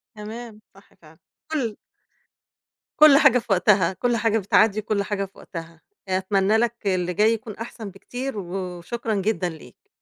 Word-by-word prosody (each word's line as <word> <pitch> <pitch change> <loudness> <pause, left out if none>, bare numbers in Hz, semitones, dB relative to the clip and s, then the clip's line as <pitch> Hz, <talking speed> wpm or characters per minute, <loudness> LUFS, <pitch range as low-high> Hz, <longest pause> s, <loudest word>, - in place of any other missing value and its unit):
تمام، 215 +1 -9
صح 195 +1 -20
فعلًا، 160 0 -18 0.3
كُلّ 240 -9 -2 1.2
كُلّ 300 -2 +9
حاجة 250 -2 +5
في 235 - -13
وقتها، 190 -1 +3
كُلّ 240 +5 0
حاجة 225 -1 +1
بتعدّي 210 +1 +3
وكُلّ 210 -1 -1
حاجة 200 -1 -2
في 195 - -19
وقتها، 165 -2 -9 0.3
آآ، 185 - +2
أتمنى 195 +2 +2
لك 235 +1 +1
اللي 180 -1 0
جاي 215 +5 +3
يكون 215 -1 -6
أحسن 225 -2 -7
بكتير، 245 +6 -6
و 195 - -3 0.4
وشكرا 225 +5 -4
جدًا 190 -3 0
ليك. 160 -2 -14
210 Hz, 160 wpm, -23 LUFS, 190-230 Hz, 1.2 s, كُلّ